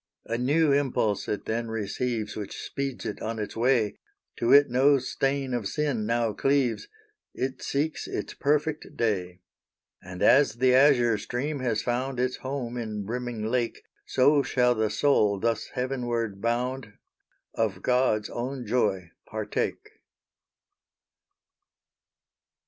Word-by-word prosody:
A 115 - -2
new 145 +6 +2
impulse 130 -7 +1
it 105 -1 -3
then 115 +1 -2
receives 110 0 -3
Which 105 -2 -6
speeds 135 -3 -4
it 110 - -5
on 115 +1 -3
its 105 -1 -5
way; 115 -2 +1 0.4
To 120 - +1
it 145 0 +8
no 135 +3 +4
stain 135 +1 -1
of 120 -5 -1
sin 135 -5 -1
now 115 -1 +1
cleaves 135 - +1 0.5
It 130 +1 -3
seeks 150 +3 -2
its - - -4
perfect 150 +2 -1
day. 95 -5 -1 0.6
And 90 -1 -6
as 140 -4 +5
the 125 +1 +3
azure 125 -5 +5
stream 140 +4 -3
has 115 -4 -1
found 125 +1 -2
Its 125 0 0
home 130 -3 -4
in 105 -4 -4
brimming 120 0 -4
lake, 120 +1 -1 0.2
So 145 +3 +4
shall 125 -2 +2
the 110 -2 0
soul 105 -9 +2
thus 115 +1 -1
heavenward 120 -5 -2
bound 120 0 -2 0.6
Of 100 -5 -1
God's 125 -4 +2
own 125 +1 -4
joy 100 -7 0 0.2
partake. 110 -1 -3
120 Hz, 130 wpm, -27 LUFS, 110-135 Hz, 0.6 s, it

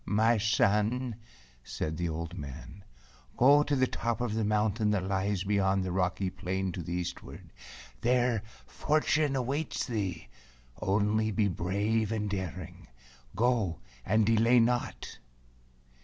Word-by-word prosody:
"My 110 +3 +3
son," 110 +2 +1 0.5
said 75 +5 -4
the 85 0 -1
old 85 +2 -5
man, 80 +5 -9 0.5
"go 140 +4 +6
to 145 -1 0
the 130 -1 +3
top 120 -2 -2
of 120 -3 -1
the 110 0 0
mountain 105 +1 +1
that 105 -3 +1
lies 95 0 -1
beyond 95 -1 +1
the 90 - -3
rocky 90 +1 0
plain 95 +1 -3
to 90 - -5
the 85 +1 -5
eastward. 90 0 -6 0.5
There 120 -2 +2 0.2
fortune 150 -1 +1
awaits 135 +4 -2
thee; 100 - -3 0.5
only 105 +2 +1
be 105 -1 +1
brave 100 +5 0
and 105 -2 -1
daring. 95 -6 -6 0.5
Go, 110 -6 +1 0.3
and 110 +6 +2
delay 115 +3 +4
not." 120 +1 -1
105 Hz, 130 wpm, -30 LUFS, 95-115 Hz, 0.5 s, go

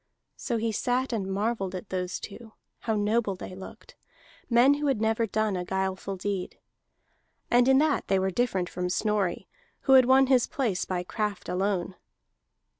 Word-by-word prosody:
So 235 - -2
he 225 0 -1
sat 250 +3 -1
and 200 -4 -2
marvelled 195 -1 -1
at 185 +2 -7
those 180 -1 -3
two, 220 +1 -10 0.3
how 220 -2 -1
noble 210 -1 +1
they 185 - -8
looked, 190 +1 -11 0.5
men 245 +3 +5
who 290 0 -1
had 270 -6 +1
never 225 +1 +1
done 215 -1 0
a 180 - -2
guileful 190 +1 -3
deed; 190 0 -4 0.9
and 245 +1 +5
in 265 0 +6
that 300 +1 +1
they 195 - +2
were 190 0 0
different 190 -5 0
from 180 0 -3
Snorri, 205 -1 -1 0.3
who 270 - +3
had 260 -1 +8
won 265 +1 +5
his 255 -2 +3
place 225 -10 -1
by 180 -1 -2
craft 210 +1 -3
alone. 190 0 -1
210 Hz, 170 wpm, -27 LUFS, 190-240 Hz, 0.9 s, had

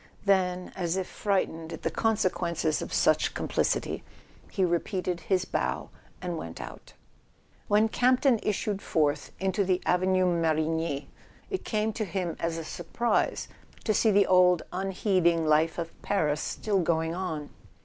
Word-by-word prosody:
Then, 185 -2 +1
as 175 -1 -1
if 190 - -1
frightened 170 -6 -1
at - - -8
the - - 0
consequences 175 -7 0
of - - -6
such - - +2
complicity, - - 0 0.5
he 190 - +1
repeated 180 +1 -1
his 185 0 0
bow - - -2 0.3
and 175 -2 -3
went 85 0 -7
out. - - -9 0.7
When 210 +2 +4
Campton 250 +1 +3
issued 205 -1 -1
forth 150 -3 0
into 190 +1 +1
the 185 -1 +1
Avenue 185 +1 +3
Mar 165 -3 +2
igny, 160 -2 -1 0.5
it 380 - -2
came 215 0 -1
to 220 - -2
him 175 -2 -3
as 165 0 -1
a 165 - -4
surprise 175 +10 -1 0.4
to 215 - +1
see 220 - +3
the 205 -1 +5
old 180 -2 +5
un¬ 195 +1 -2
heeding 175 -4 +2
life 155 +1 +3
of 165 -1 -3
Paris 150 -7 0
still 205 -3 -1
going 165 -1 +1
on. 160 -5 -4
180 Hz, 150 wpm, -28 LUFS, 165-195 Hz, 0.7 s, the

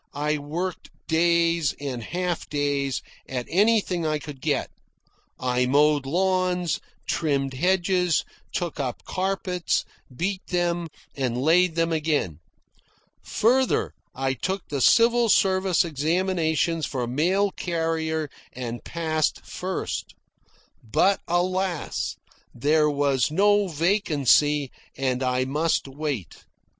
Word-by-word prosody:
I 150 +1 0
worked 170 +6 -4 0.2
days, 170 -2 +2
and 135 -4 -4
half 175 +5 -3
days, 140 -2 -1 0.3
at 125 -2 -3
anything 195 -2 +2
I 155 -1 +1
could 145 -3 -9
get. - - -1 0.7
I 125 0 +1
mowed 145 +1 +3
lawns, 180 0 +1 0.3
trimmed 140 -4 0
hedges, 180 +2 +2 0.3
took 170 -3 -3
up 130 -3 -3
carpets, 185 -2 -1 0.3
beat 185 +8 -2
them, 175 -1 0 0.3
and 125 -3 -1
laid 165 +4 +3
them 165 0 +1
again. 150 - 0 0.8
Further, 255 +3 +1 0.2
I 135 0 0
took 190 - -3
the 140 -2 -2
civil 235 - +5
service 190 -3 +3
examinations 165 0 0
for 125 -3 -2
mail 180 +11 +1
carrier 160 -3 -1 0.3
and 120 -1 -5
passed 160 -2 -1
first. 185 0 -4 0.7
But 190 - +2
alas! 180 -1 -1 0.4
there 150 +5 +3
was 140 -3 +1
no 205 +5 +3
vacancy, 150 - +2 0.3
and 130 -1 0
I 130 0 +1
must 150 +3 0
wait. 135 - -5
160 Hz, 105 wpm, -25 LUFS, 140-180 Hz, 0.8 s, civil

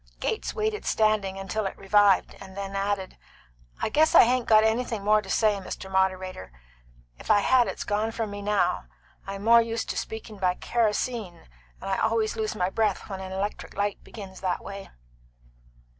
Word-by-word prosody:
Gates 445 - -2
waited, 430 -1 -1
standing, 195 -3 0
till 215 +1 -1
it - - -7
revived, 200 0 +3
and 190 0 -11
then 195 0 -5
added: 195 -1 -2 0.6
"I - - +1
guess 310 +7 +3
I - - +10
hain't 245 0 +1
got 215 -1 +6
anything 225 -1 0
more 210 +1 +4
to - - -12
say, 215 -3 +2
Mr. 190 0 -7
Moderator. 185 - -1 0.7
If - - -11
I 205 - +5
had 250 +2 +4
it's - - -4
gone 210 +2 -1
from 225 -2 -3
me 205 0 -6
now. 205 - 0 0.4
I'm 195 0 -6
more 235 +1 +7
used 230 0 -3
to - - -5
speaking 220 -2 -6
by 180 -1 +1
kerosene, 225 -4 -2 0.3
and - - -8
I 195 - 0
always 220 -1 +1
lose 215 0 -2
my 185 -2 0
breath 210 -2 -1
when 190 - -4
an 190 0 -7
electric 195 +2 -4
light 205 0 -1
begins 195 -4 -10
that 185 -2 -2
way." 200 0 -8
205 Hz, 180 wpm, -26 LUFS, 195-220 Hz, 0.7 s, I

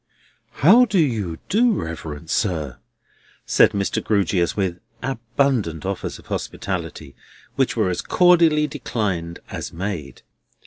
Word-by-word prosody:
"How 235 +9 +8
do 210 -4 -1
you 110 - 0
do, 235 +3 +3
reverend 80 - -5
sir?" 80 - -1 0.7
said - - +5
Mr. 100 -1 -1
Grewgious, 95 -4 +1
with 90 -3 -1 0.2
abundant 120 - -1
offers 95 0 -3
of - - -17
hospitality, - - -5 0.4
which - - 0
were 90 - +2
as 90 - -2
cordially 170 -4 +4
declined 105 - -3
as - - -5
made. 85 -5 -5
100 Hz, 120 wpm, -22 LUFS, -, 0.7 s, How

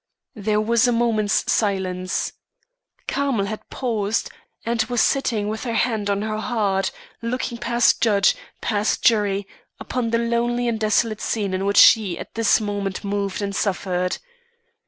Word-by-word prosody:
There 210 -2 0
was 230 +3 +3
a - - +3
moment's 230 -3 +1
silence. 185 -3 -1 0.7
Carmel 275 -8 0
had 215 +2 -7
paused, 225 -4 -1 0.3
and 230 0 +1
was 245 -1 -2
sitting 225 -7 +1
with 215 +1 -4
her 235 -3 -2
hand 220 -5 0
on 200 0 0
her 215 0 -2
heart, 205 -5 0 0.3
looking 235 0 -3
past 235 0 +2
judge, 200 -4 +4 0.3
past 210 -1 0
jury, 205 -3 +2 0.3
upon 245 -2 -2
the 230 - +2
lonely 235 +1 0
and 230 -2 -1
desolate 215 0 +1
scene 205 -4 -1
in 190 +1 -1
which 200 - +1
she 205 -6 +6
at - - -9
this 225 -2 +3
moment 205 -2 -3
moved 200 0 -2
and 200 0 -3
suffered. 180 -2 -1
215 Hz, 150 wpm, -22 LUFS, 200-235 Hz, 0.7 s, she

